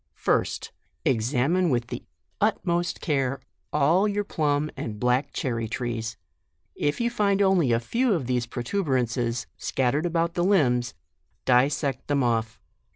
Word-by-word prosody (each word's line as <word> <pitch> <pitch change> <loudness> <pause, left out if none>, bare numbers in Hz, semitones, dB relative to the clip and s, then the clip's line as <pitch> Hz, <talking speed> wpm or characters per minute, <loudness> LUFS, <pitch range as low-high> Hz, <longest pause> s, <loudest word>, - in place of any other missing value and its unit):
First, - - 0 0.3
examine 135 +9 +2
with 120 -3 +1
the - - -5 0.4
utmost 175 0 0
care 135 -4 0 0.3
all 175 +9 +3
your 205 0 0
plum 150 -5 0
and 105 -2 -5
black 125 +4 +1
cherry 115 -3 -2
trees. 115 -2 -3 0.6
If 145 +1 -1
you 235 0 +1
tind 200 -4 +2
only 190 -9 +3
a 115 - +3
few 235 - +1
of 160 -8 -1
these 125 -1 0
protuberances 125 - -1
scat 125 -2 0
tered 150 +4 0
about 170 0 0
the 175 -1 0
limbs, 125 -11 +2 0.5
dissect 135 +1 +2
them 145 -2 +2
off. 115 -2 0
135 Hz, 140 wpm, -26 LUFS, 120-170 Hz, 0.6 s, all